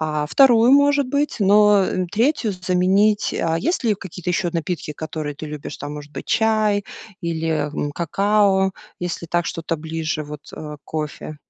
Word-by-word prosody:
э, 150 -1 -1
2, 245 - +5
может 285 -1 +4
быть, 285 +3 0
но, 205 0 +5
э, 185 -1 -1
3 230 +1 +1
заменить. 190 +3 +2
А 165 0 0
есть 335 - -1
ли 220 -3 +3
какие-то 180 -2 -6
ещё 175 0 0
напитки, 165 -2 -3
которые 155 -1 -5
ты 145 - -8
любишь? 150 -1 -7
Там, 145 +1 -6
может 145 0 -9
быть, - - -7
чай 215 -2 +2 0.4
или, 160 -2 -1
м, 145 -1 -3
какао, 195 +2 +2 0.3
если 175 -1 -4
так 175 +1 0
что-то 165 -1 -3
ближе 155 -1 -3
вот, 150 0 -8
э, - - -10 0.2
к 145 - -31
кофе? 155 0 -5
180 Hz, 165 wpm, -21 LUFS, 155-210 Hz, 0.4 s, 2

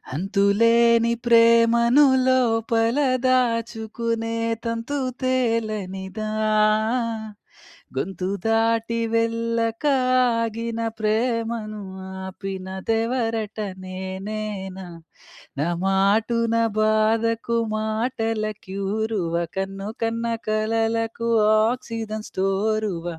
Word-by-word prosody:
అంతులేని 230 +5 +3
ప్రేమను 235 +3 +5 0.2
లోపల 230 -1 +2 0.3
దాచుకునే 230 -2 -1 0.3
తంతు 230 +5 -3 0.2
తేలనిదా, 215 -5 -1 1.7
గొంతు 185 -1 -3 0.2
దాటి 225 +1 +1 0.2
వెళ్ళక 230 +1 0 0.5
ఆగిన 230 0 -3 0.2
ప్రేమను 225 -1 -1 0.4
ఆపినదెవరట 215 +4 -3 0.3
నేనేనా, 190 +1 -5 0.7
నా 150 - +1 0.2
మాటున 215 +4 +2 0.3
బాధకు 225 +2 +2 0.2
మాటల 225 0 -1 0.2
క్యూరువ, 200 -1 -2 0.2
కన్ను 195 +1 -4
కన్న 230 +1 -1 0.2
కలలకు 225 +1 0 0.4
ఆక్సిజన్ 225 -3 -5
స్టోరువ, 195 -1 -1
225 Hz, 60 wpm, -23 LUFS, 205-230 Hz, 1.7 s, ప్రేమను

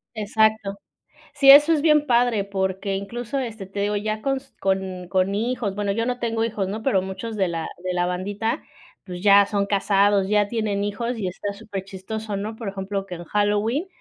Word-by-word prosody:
Exacto. 215 -1 +1 0.6
Sí, 280 -2 +4
eso 295 +4 +8
es 305 - +1
bien 300 -1 +4
padre, 240 -4 +3
porque 195 0 -2
incluso, 235 +7 -4
este, 225 -6 -4
te 195 +2 -5
digo, 205 +1 0
ya 215 +1 -3
con 270 +3 0
s 270 +1 -13
con 190 -2 -1
con 190 +1 +1
hijos, 225 -2 -2
bueno, 205 -1 -1
yo 230 +3 -1
no 250 0 -2
tengo 225 -1 -1
hijos, 205 -4 -2
¿no?, 215 +2 -5
pero 205 -8 +2
muchos 190 +4 -6
de 195 -3 +1
la 165 -1 -3 0.2
de 185 0 -2
la 175 0 +1
bandita, 200 +5 -2 0.4
pues, 180 -2 -7
ya 200 0 +7
son 200 0 0
casados, 200 -1 +2
ya 210 -1 +3
tienen 210 -2 -1
hijos 235 +4 -3
y 195 - -2
está 195 +3 -4
superchistoso, 200 +1 -6
¿no?, 215 +3 -4
por 220 -2 -5
ejemplo, 195 0 -4
que 180 - -7
en 175 0 -9
Halloween, 210 - 0
205 Hz, 195 wpm, -23 LUFS, 195-225 Hz, 0.6 s, eso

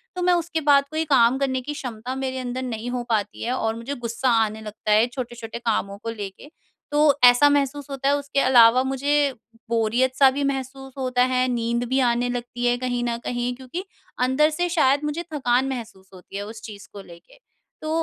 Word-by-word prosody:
तो 360 - -3
मैं 360 - +4
उसके 340 -1 -1
बाद 280 0 +5
कोई 315 +1 -1
काम 260 -3 +4
करने 260 -2 -1
की 295 +4 -5
क्षमता 250 -3 -6
मेरे 260 -1 -3
अंदर 255 0 -4
नहीं 240 -1 -4
हो 245 -1 -2
पाती 210 -2 -1
है 245 +2 -1
और 225 -3 -1
मुझे 235 +5 -5
ग़ुस्सा 240 +1 -2 0.2
आने 215 +1 -7
लगता 215 0 -5
है 215 +3 +5
छोटे-छोटे 240 -2 -7
कामों 210 -4 -1
को 230 - -3
लेके। 205 +4 -8 0.4
तो 295 -1 +3
ऐसा 245 +4 +7
महसूस 285 0 0
होता 275 0 -1
है, 285 - +3
उसके 280 0 -2
अलावा 250 -1 +6
मुझे 280 +1 +1 0.4
बोरियत 235 +3 +1
सा 270 -1 +6
भी 280 +2 -2
महसूस 270 -1 -4
होता 255 -2 +1
है, 255 0 +1
नींद 235 -1 -1
भी 260 +1 +1
आने 245 -1 +1
लगती 245 0 -4
है 245 0 +2
कहीं 245 -1 -2
न 235 -1 -1
कहीं 245 0 -2
क्योंकि 260 +8 -7 0.4
अंदर 260 +5 +3
से 350 +3 -1
शायद 290 -4 +2
मुझे 300 +3 -3
थकान 260 -2 +1
महसूस 220 -7 -7
होती 185 +1 -10
है 205 - -4
उस 220 +1 -10
चीज़ 205 -2 -10
को 200 - -8
लेके। 175 - -16 0.4
तो 310 - -5
255 Hz, 205 wpm, -23 LUFS, 235-275 Hz, 0.4 s, ऐसा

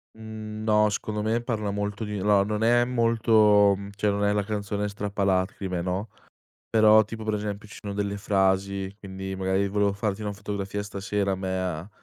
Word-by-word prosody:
Mhmm, 110 -1 -7
no, 105 -1 +4
secondo 105 +1 -3
me 110 +2 0
parla 110 -4 -2
molto 105 +1 -3
di 105 -1 -4
no, 100 0 +4
non 105 +1 -2
è 120 +1 +5
molto 110 -4 +4
mhmm, 100 +1 -8
cioè 105 +1 +1
non 100 0 0
è 100 - +2
la 105 -1 +1
canzone 105 0 -2
strappalacrime, 95 -2 -1
no, 95 +4 -3 0.6
però 110 -1 +6
tipo 110 +1 -7
per 110 -1 -1
esempio 105 0 -5
ci - - -11
sono 100 -1 -5
delle 100 0 -2
frasi 95 0 0
quindi 95 0 -6
magari: 95 +1 0
"volevo 100 0 +1
farti 100 0 -2
una 105 -1 -3
fotografia 100 0 -4
stasera 100 -1 -2
me 95 0 -3
a 90 0 -4
105 Hz, 180 wpm, -26 LUFS, 100-105 Hz, 0.6 s, però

